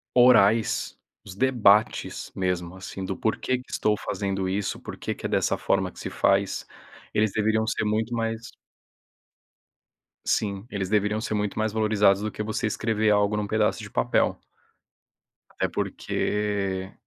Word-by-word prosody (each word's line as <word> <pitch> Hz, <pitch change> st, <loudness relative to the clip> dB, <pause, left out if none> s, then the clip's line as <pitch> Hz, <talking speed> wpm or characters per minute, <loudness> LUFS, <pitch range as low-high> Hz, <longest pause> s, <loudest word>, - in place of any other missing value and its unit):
orais, 115 Hz, -3 st, +4 dB, 0.3 s
os 90 Hz, -, -10 dB
debates 110 Hz, -3 st, +2 dB
mesmo, 90 Hz, -1 st, -2 dB
assim, 95 Hz, 0 st, -7 dB
do 95 Hz, -, -3 dB
porquê 125 Hz, +4 st, -1 dB
que 125 Hz, -, -15 dB
estou 105 Hz, -1 st, +1 dB
fazendo 95 Hz, -2 st, -2 dB
isso, 100 Hz, +1 st, -2 dB
porquê -, -, -5 dB
que -, -, -5 dB
é -, -, -9 dB
dessa -, -, +1 dB
forma -, -, +1 dB
que -, -, -14 dB
se -, -, -4 dB
faz, 100 Hz, 0 st, +1 dB, 0.5 s
eles 105 Hz, -1 st, +2 dB
deveriam 110 Hz, 0 st, +1 dB
ser 115 Hz, -, 0 dB
muito 110 Hz, +2 st, 0 dB
mais 115 Hz, 0 st, -2 dB, 1.8 s
Sim, 100 Hz, 0 st, -1 dB
eles 100 Hz, -2 st, -3 dB
deveriam 105 Hz, +1 st, +1 dB
ser 110 Hz, -, -3 dB
muito 105 Hz, 0 st, -1 dB
mais 110 Hz, -1 st, 0 dB
valorizados 105 Hz, -2 st, +3 dB
do 110 Hz, -, -2 dB
que 105 Hz, -, -5 dB
você 110 Hz, +2 st, -2 dB
escrever 110 Hz, 0 st, +1 dB
algo 105 Hz, 0 st, +3 dB
num 105 Hz, -1 st, -1 dB
pedaço 110 Hz, 0 st, +1 dB
de -, -, -9 dB
papel. -, -, +1 dB, 1.1 s
Até -, -, -1 dB
porque 100 Hz, -2 st, -2 dB
105 Hz, 150 wpm, -26 LUFS, 100-110 Hz, 1.8 s, orais